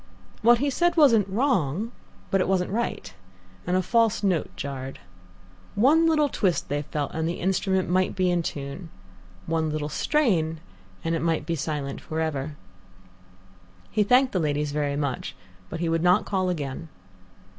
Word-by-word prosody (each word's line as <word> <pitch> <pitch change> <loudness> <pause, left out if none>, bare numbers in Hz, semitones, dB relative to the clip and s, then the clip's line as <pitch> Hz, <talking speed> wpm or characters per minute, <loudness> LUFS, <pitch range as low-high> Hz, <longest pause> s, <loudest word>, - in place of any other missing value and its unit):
What 235 +2 +6
he 280 +3 0
said 345 +4 +1
wasn't 230 - +5
wrong, 205 - 0 0.4
but 195 - +3
it - - 0
wasn't 185 -1 +1
right, 235 +3 -3 0.5
and 180 +1 +2
a 185 - +1
false 225 +1 +2
note 185 -6 +1
jarred. 135 -1 -5 0.8
One 295 +10 +5
little 305 -2 +3
twist, 190 -10 0
they 145 +1 -1
felt, 145 -1 -3
and 160 0 -1
the 170 - -4
instrument 190 0 0
might 185 +2 +1
be 185 -1 +2
in 175 -1 +1
tune. 145 +3 -6 0.6
One 160 -1 0
little 150 -1 -3
strain, 170 - +1 0.4
and 165 - -1
it 165 - -1
might 165 -1 0
be 170 - -1
silent 145 -2 -3
for 160 - -4
ever. 150 -2 -2 1.4
He 215 - +1
thanked 250 +5 +4
the 185 - 0
ladies 150 -2 0
very 145 -1 -1
much, 140 -3 -3 0.3
but 165 - -5
he 170 - 0
would 165 0 +1
not 180 +4 +4
call 185 -2 0
again. 155 -1 -4
175 Hz, 165 wpm, -25 LUFS, 150-210 Hz, 1.4 s, What